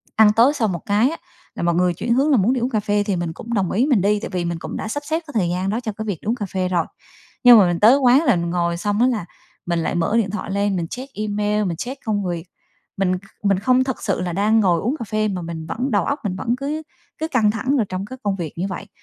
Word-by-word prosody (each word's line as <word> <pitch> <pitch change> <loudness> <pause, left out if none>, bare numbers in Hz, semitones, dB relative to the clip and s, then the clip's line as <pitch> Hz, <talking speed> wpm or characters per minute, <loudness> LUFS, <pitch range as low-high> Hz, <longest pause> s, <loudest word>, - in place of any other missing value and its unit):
ăn 215 -1 +6
tối 240 +7 +5
xong 225 -8 0
một 170 - -4
cái 215 +6 +3
á, 330 - -5 0.4
là - - -4
mọi 170 -1 +2
người 180 0 +2
chuyển 235 +7 -1
hướng 275 +5 +2
là 265 - +5
muốn 215 +6 +3
đi 255 - -1
uống 245 - 0
cà 220 - 0
phê 205 0 0
thì 200 -3 -1
mình 170 -2 -3
cũng 235 +7 -7
đồng 195 -5 0
ý 235 +7 +2
mình 260 -9 +3
đi, 205 +2 +2
tại - - -6
vì 180 -2 -2
mình 170 -1 -3
cũng - - -6
đã - - -4
sắp 290 +6 -4
xếp 320 +2 0
cái 290 - -10
thời 175 -3 0
gian 180 +2 -1
đó 220 +3 -1
cho 230 -3 -4
cái 220 - -4
việc 200 -7 -3
đi - - -10
uống 230 - +1
cà 215 -5 -4
phê 185 -1 -2
rồi. 175 -3 +1 0.6
Nhưng 245 -2 +10
mà 190 - +5
mình 175 -1 -1
tới 230 +6 +7
quán 265 +2 +4
là 250 - +4
ngồi 170 0 -1
xong 205 +4 -1
á 250 - +5
là 230 -8 -1 0.4
mình 170 -1 0
lại 165 - -1
mở 175 +6 +1
điện 215 -4 +1
thoại 210 - -4
lên, 200 0 0
mình 170 -2 -2
check 265 +6 -8
email, 210 0 -1
mình 170 -3 -2
check 260 - -6
công 205 -3 -1
việc, 175 -2 -3 0.5
mình 185 -1 +1
kh - - -29 0.2
mình 195 -2 +2
không 255 +4 +3
thực 260 -2 -4
sự 195 -3 -1
là 180 -1 -3
đang 210 +4 +3
ngồi 180 -5 +3
uống 245 +7 -1
cà 230 - -4
phê, 215 0 0
mà 190 -3 -3
mình 165 -1 -6
vẫn 255 +8 -2
đầu 205 -3 +2
óc 285 +1 -1
mình 195 -4 -2
vẫn 230 +6 -1
cứ 295 +4 -3 0.3
cứ 315 - -2
căng 230 -9 +2
thẳng 255 +6 0
rồi 230 - +2
trong 185 +1 -4
cái 260 +5 -9
công 200 -1 0
việc 170 -5 -5
như 180 +3 -1
vậy. 185 -3 -6
210 Hz, 305 wpm, -21 LUFS, 180-240 Hz, 0.6 s, Nhưng